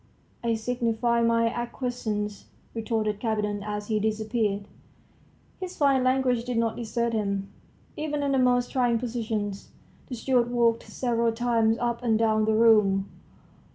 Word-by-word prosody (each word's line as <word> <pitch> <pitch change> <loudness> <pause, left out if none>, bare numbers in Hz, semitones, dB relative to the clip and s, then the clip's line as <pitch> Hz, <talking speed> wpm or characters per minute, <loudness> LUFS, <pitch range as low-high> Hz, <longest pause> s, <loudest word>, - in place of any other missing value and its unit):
"I 230 -1 +1
signify 235 0 0
my 230 0 +3
acquiescence," 230 -3 -3 0.3
retorted 220 -2 -1
Kapiton 210 -2 -1
as 210 0 -4
he 215 0 0
disappeared. 215 -1 -1 0.9
His 370 -1 -6
fine 275 -3 +3
language 255 -2 +2
did 245 -1 -3
not 230 -1 +1
desert 235 0 -2
him, 200 -2 -2 0.4
even 300 -1 -2
in 280 - 0
the 270 - +2
most 245 -1 +2
trying 245 -3 +2
positions. 220 -4 -3 0.4
The 255 - -5
steward 245 0 +1
walked 235 -1 +1
several 235 -2 0
times 230 -1 +1
up 235 0 -2
and 230 -3 +2
down 220 -1 +2
the 220 0 +2
room. 210 -4 +4
230 Hz, 140 wpm, -26 LUFS, 215-245 Hz, 0.9 s, room